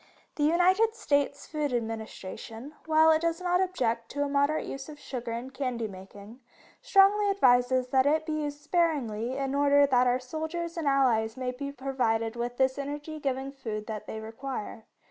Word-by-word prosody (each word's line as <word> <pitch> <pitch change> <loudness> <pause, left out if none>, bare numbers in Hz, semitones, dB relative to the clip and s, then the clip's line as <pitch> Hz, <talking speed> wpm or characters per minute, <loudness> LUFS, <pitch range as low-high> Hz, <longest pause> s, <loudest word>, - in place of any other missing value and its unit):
The 295 - -1
United 370 +7 +3
States 285 -9 0
Food 300 -3 -2
Administration, 225 +2 -5
while 315 0 +6
it 315 0 +3
does 335 0 0
not 360 0 +1
object 235 -11 -1
to 285 +1 -1
a - - -1
moderate 285 +2 +1
use 275 +2 -7
of 300 - -9
sugar 245 -4 -6
in 240 +3 -5
candy 255 -4 -3
making, 200 +4 -12 0.4
strongly 400 +1 +4
advises 255 -8 +3
that 265 +1 +3
it 310 +2 +2
be 315 - -4
used 290 0 -4
sparingly 270 -8 0
in 270 -1 -2
order 285 0 +5
that 250 -2 +3
our 245 0 +3
soldiers 320 +6 -4
and 330 -4 -2
allies 240 -5 +2
may 255 -1 -2
be 280 +3 -6
provided 245 -4 -1
with 240 +1 -4
this 265 +1 +2
energy 295 +2 -5
giving 270 -1 -2
food 220 -6 -5
that 215 -2 -6
they 220 - -5
require. 225 0 -6
275 Hz, 175 wpm, -28 LUFS, 240-310 Hz, 0.4 s, while